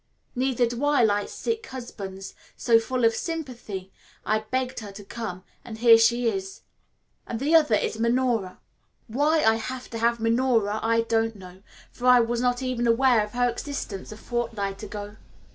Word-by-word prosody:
Neither 255 -1 +1
do 240 +3 -4
I 290 -4 +3
like 205 -2 +1
sick 455 -1 -3
husbands, 195 -7 -8 0.2
so, 230 -2 +4
full 250 +1 -1
of 225 - +4
sympathy, 240 - -5 0.3
I 215 0 +2
begged 255 +4 -3
her 210 -3 -8
to 200 +1 -11
come, 200 -4 -6 0.2
and 225 -3 -8
here 230 0 +7
she 235 +1 +3
is. 385 - -3 0.7
And 230 - -4
the 290 +5 0
other 305 -9 +5
is 220 - -2
Minora. 235 -5 0 0.5
Why 295 +7 +1
I 220 0 +4
have 255 +3 -6
to 230 - -4
have 235 +1 +2
Minora 225 -2 +1
I 230 0 +2
don't 225 0 0
know, 185 -1 -13 0.3
for 250 - -4
I 250 -1 +8
was 235 0 0
not 250 +1 0
even 250 -2 -1
aware 235 -1 +4
of 210 - -8
her 245 0 +2
existence 235 -6 -5
a 215 - -9
fortnight 220 -4 -3
ago. 210 0 -7
235 Hz, 175 wpm, -25 LUFS, 215-255 Hz, 0.7 s, I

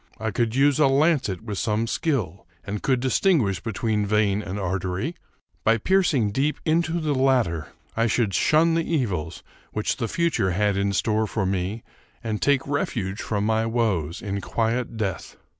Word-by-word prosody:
I 110 0 -2
could 115 +2 0
use 140 +1 +3
a 150 - +6
lancet 135 - +2
with 105 -4 -4
some 110 0 0
skill, 115 - -2 0.2
and 105 0 -4
could 130 -2 +1
distinguish 130 - +2
between 110 -1 -1
vein 105 -1 +2
and 100 -1 -5
artery. 95 - -2 0.5
By 115 +1 +4
piercing 145 - +2
deep 140 +7 0
into 165 +1 +1
the 155 -2 0
latter, 125 - +1 0.3
I 115 +1 +2
should 110 -3 +1
shun 160 - +3
the 165 0 +1
evils 90 - -2 0.3
which 105 - -1
the 115 - -2
future 115 - 0
had 105 +1 +1
in 100 0 0
store 110 +2 +1
for 105 -1 -2
me, 95 +4 -2 0.4
and 110 -2 -3
take 140 -2 +2
refuge 110 -8 -2
from 105 -1 -1
my 110 +1 +1
woes 105 -9 -1
in 100 -1 -3
quiet 115 +2 -1
death. 100 -4 -3
110 Hz, 165 wpm, -24 LUFS, 100-135 Hz, 0.5 s, a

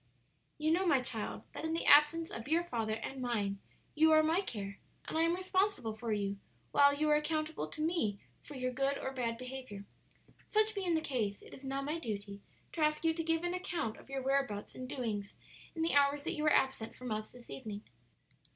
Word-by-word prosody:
"You 310 +1 +1
know, 365 +3 +2
my 285 -6 +5
child, 230 -4 -3
that - - -7
in 320 0 0
the 330 - -1
absence 300 +3 +6
of 230 - -6
your 330 +3 +3
father 225 -10 -2
and 260 +4 -6
mine 205 -5 -1 0.3
you 315 +1 +5
are 310 0 +7
my 325 +4 +3
care 200 - -5 0.3
and - - -4
I 320 - +3
am 335 +1 +3
responsible 375 - 0
for 225 +1 -4
you, 200 -1 -1 0.3
while 285 0 +7
you 305 +1 +1
are - - +7
accountable 310 +1 -1
to 310 - -7
me 310 - 0 0.2
for 290 - -10
your 255 -1 -1
good 275 +2 0
or 265 - -3
bad 235 -3 -1
behavior. 255 -5 -7 0.6
Such 435 0 +3
being 375 -5 0
the 320 - +1
case, 225 -9 -1
it - - -13
is 265 - -11
now 270 +1 -2
my 300 +4 -2
duty 200 -6 -5 0.3
to 330 - -3
ask 305 +1 +2
you 325 - +4
to 330 0 -2
give 325 +1 +1
an 350 0 0
account 350 -11 -2
of - - -16
your 270 -1 -3
whereabouts 270 -6 0
and 255 0 -7
doings 210 -7 -3 0.4
in 320 - -1
the 330 - +1
hours 285 0 +4
that - - -1
you 300 - -3
were 305 0 +4
absent 265 -5 +2
from 250 -2 -6
us 215 0 -3
this 245 -1 -12
evening." 215 -5 -6
275 Hz, 215 wpm, -34 LUFS, 225-320 Hz, 0.6 s, are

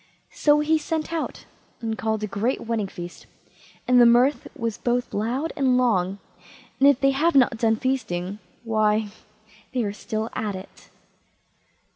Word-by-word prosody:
So 295 0 +3
he 315 +1 +2
sent 315 +1 -3
out, 325 - -4 0.3
and 225 -1 -3
called 220 -1 -2
a - - +1
great 210 +5 -1
wedding 225 -3 -2
feast, 175 -2 -9 0.6
and 250 0 +6
the - - +8
mirth 245 +5 +3
was 230 -4 -3
both 245 0 -1
loud 245 +10 -1
and 265 -4 +2
long, 195 -6 +1 0.6
and 275 - +7
if 280 -2 +3
they 275 0 +3
have 300 +4 +1
not 250 -4 +4
done 225 -1 +2
feasting, 205 -7 -2 0.2
why, 215 -1 +1 0.7
they 245 - +1
are 200 -1 -2
still 220 +1 -4
at 210 -3 -3
it. 185 +1 -12
235 Hz, 155 wpm, -24 LUFS, 215-270 Hz, 0.7 s, the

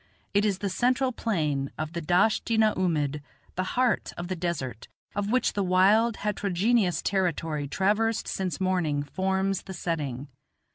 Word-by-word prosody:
It 205 +1 +3
is 200 -3 +1
the 200 - -3
central 250 +6 +1
plain 150 - -1
of 155 +1 -4
the 170 - -3
Dasht 180 +9 +2
i - - +4
na 215 -1 +4
oomid, 150 -5 0 0.3
the 185 - -1
heart 250 -2 +1
of 175 +1 -5
the 185 - -1
desert, 160 -10 -4 0.3
of 205 0 -1
which 255 +3 +2
the 205 - -1
wild, 200 +5 +4
heterogeneous 205 0 +1
territory 165 -6 -1
traversed 215 +8 +1
since 190 -1 -2
morning 175 -6 0
forms 190 +5 -1
the 190 - -8
setting. 145 -6 -3
185 Hz, 155 wpm, -27 LUFS, 160-210 Hz, 0.3 s, i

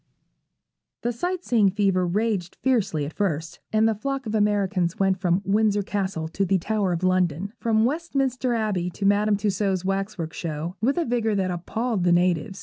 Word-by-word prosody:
The 240 - +1
sight 355 +8 -3
seeing 220 -5 +4
fever 190 -2 +1
raged 200 -1 -1
fiercely 215 - +1
at 150 - -7
first, 165 -4 -2
and 220 +1 +3
the 225 - +2
flock 270 +5 -3
of 215 - -4
Americans 200 -4 +1
went 190 -1 +1
from 180 +1 +1
Windsor 205 0 +2
Castle 190 -5 -2
to 190 +4 -1
the 195 0 +2
Tower 200 +1 0
of 175 +1 -2
London, 185 +1 +1
from 220 -1 +2
Westminster 270 -4 0
Abbey 205 -6 -1
to 195 +3 -5
Madame 205 +1 +3
Taussaud's 195 -2 0
Waxwork 195 -4 -2
Show, 165 +2 -4
with 265 +8 +1
a 340 - +1
vigour 230 -3 0
that 190 -2 0
appalled 215 +4 -2
the 175 - +3
natives. 180 +2 +1
200 Hz, 175 wpm, -24 LUFS, 180-220 Hz, -, seeing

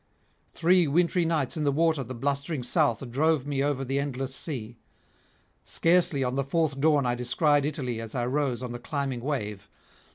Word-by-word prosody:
Three 175 0 +3
wintry 170 +3 +2
nights 160 -3 0
in 155 - -2
the 145 - +2
water 160 -1 +2
the 130 +1 -7
blustering 140 +2 -2
south 120 +1 +1
drove 150 +1 +2
me 140 -1 -1
over 140 -2 -1
the 135 +2 0
endless 135 -2 -3
sea; 120 -6 -5 0.8
scarcely 165 -5 +2
on 125 -1 -1
the 140 +1 0
fourth 150 0 0
dawn 150 -2 +3
I 120 - +1
descried 145 +4 +2
Italy 125 -7 -3
as 115 +1 -7
I 120 -1 0
rose 130 -2 -1
on 125 - -4
the 120 - -6
climbing 135 -1 -3
wave. 105 -8 -4
140 Hz, 175 wpm, -27 LUFS, 125-155 Hz, 0.8 s, Three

